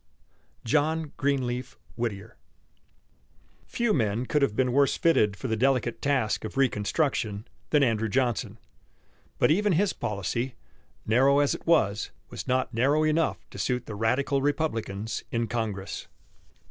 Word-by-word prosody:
JOHN 155 +4 +1
GREENLEAF 130 -3 -1 0.2
WHITTIER. 110 -2 -4 1.3
Few 235 -3 0
men 110 -1 0
could 150 +3 +1
have 115 -7 +1
been 125 0 +2
worse 140 0 +3
fitted 105 -12 +3
for 130 - -5
the 110 - 0
delicate 120 -1 +1
task 130 -7 0
of 110 +5 -6
reconstruction 110 -3 0 0.2
than 150 -2 +4
Andrew 115 -3 +1
Johnson. 120 -1 0 0.8
But - - +3
even 205 +4 +3
his 190 +4 +2
policy, 115 +5 -3 0.5
narrow 135 +5 +4
as 145 -1 +3
it - - -8
was, 110 -11 +2 0.2
was - - -7
not 130 0 0
narrow 140 +7 +2
enough 155 +1 0
to - - -9
suit 125 -1 -1
the 110 - -7
radical 130 +6 +1
Republicans 115 -8 -2
in 115 0 0
Congress. 110 -5 -4
125 Hz, 135 wpm, -27 LUFS, 110-145 Hz, 1.3 s, than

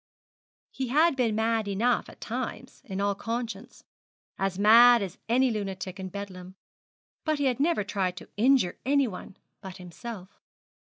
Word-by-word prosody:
He 265 - -3
had 305 +5 +3
been 235 -5 +1
mad 220 -1 0
enough 225 +5 +1
at - - -15
times - - -5
in 195 -2 -5
all 200 0 +1
conscience, 225 +1 -5 0.6
as 195 -1 -1
mad 230 +3 +7
as 190 -2 -7
any 255 +2 +3
lunatic 195 -3 -5
in 190 0 -5
Bedlam; 185 -1 -8 0.7
but 310 -1 0
he 285 - 0
had 255 -2 +1
never 315 -6 +2
tried 190 -3 -2
to - - -10
injure 240 -4 +3
any 275 0 +2
one 190 -1 -9 0.2
but 190 -2 -9
himself. 185 +2 -9
215 Hz, 155 wpm, -27 LUFS, 190-245 Hz, 0.7 s, mad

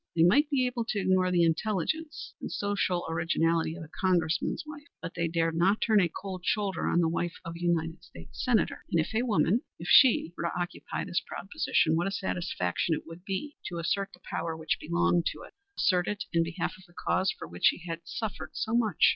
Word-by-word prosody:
They 165 - +5
might 285 - +5
be 270 -4 +2
able 245 -1 -1
to 215 - -1
ignore 185 -1 +3
the 175 -1 +3
intelligence 280 - -1
and - - -5
social 195 -3 0
originality 165 0 +1
of 175 - -7
a - - -10
Congressman's 170 - 0
wife, 295 -1 -10
but - - -6
they 170 -1 0
dared 165 0 0
not 190 +5 +3
turn 215 -3 +4
a 175 - +2
cold 185 +1 -6
shoulder 195 -3 0
on 175 - +3
the 165 - +3
wife 170 +1 -1
of 165 - -5
a 170 - -9
United 170 -1 0
States 85 - -9
Senator. 230 -7 +1
And 170 - +3
if 160 - -1
a 220 - +2
woman 215 -2 +2 0.2
if 170 - -8
she 230 - +6
were - - -3
to 170 - -2
occupy 175 0 -4
this 175 - -1
proud 195 - -7
position, 160 - +2
what 170 +3 +1
a - - -1
satisfaction 170 - -1
it - - -7
would 165 +2 -11
be 210 +9 -4
to 175 - -5
assert 195 +4 0
the 180 - -26
power 165 -1 -3
which 160 -1 -1
belonged 170 +1 +1
to - - -11
it; - - -13 0.2
assert 180 -2 +2
it 210 -1 -2
in 170 - +4
behalf 165 +1 -2
of 190 - -16
the 175 - -23
cause 190 - +1
for - - -7
which 85 +2 -3
she 175 - +4
had 165 0 -4
suffered 215 +6 -5
so 220 - -2
much! 220 -7 +3
175 Hz, 220 wpm, -29 LUFS, 165-205 Hz, 0.2 s, she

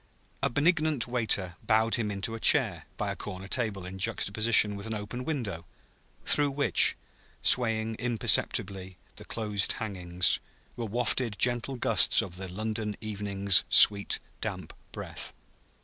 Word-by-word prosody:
A - - +1
benignant 155 -2 +1
waiter 110 -7 -2
bowed 110 +1 +1
him 110 -3 0
into 105 +3 -3
a 115 - -6
chair - - +3
by - - -3
a - - -5
corner 95 +1 -8
table 105 -5 -3
in 95 +1 -9
juxtaposition 105 +2 +3
with 100 +2 -7
an 110 - -4
open 110 +5 -7
window, 110 - -4 0.6
through 145 -1 +2
which, 140 +1 +4 0.5
swaying 115 -2 +3
imperceptibly 95 -5 0 0.2
the - - -12
closed 105 -3 -1
hangings, 90 -5 -1 0.4
were 120 - -5
wafted 120 0 -1
gentle 125 +2 0
gusts 120 - +4
of 90 -2 -7
the 95 0 -6
London 105 +2 -5
evening's 100 -3 +1
sweet, 100 -1 +4 0.2
damp - - -6 0.2
breath. - - -4
110 Hz, 135 wpm, -27 LUFS, 100-120 Hz, 0.6 s, which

